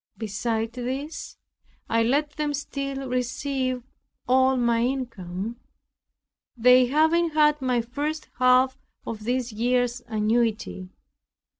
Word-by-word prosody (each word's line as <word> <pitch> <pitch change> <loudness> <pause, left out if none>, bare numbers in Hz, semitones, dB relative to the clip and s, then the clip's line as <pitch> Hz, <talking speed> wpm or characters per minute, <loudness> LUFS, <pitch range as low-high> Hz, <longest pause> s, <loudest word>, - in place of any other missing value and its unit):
Besides 225 +1 -2
this, 260 +5 -5 0.5
I 230 0 +2
let 285 +6 +1
them 295 -1 -2
still 275 -1 -4
receive 255 0 -2 0.4
all 260 +1 +4
my 235 -1 +2
income, 230 -5 -3 1.0
they 250 +1 +6
having 320 +5 +3
had 300 -1 +3
my 250 -2 +1
first 290 +6 -4
half 255 +1 +4 0.3
of 215 -2 -6
this 245 0 -1
year's 245 +2 0
annuity. 220 -3 0
250 Hz, 105 wpm, -25 LUFS, 230-275 Hz, 1.0 s, they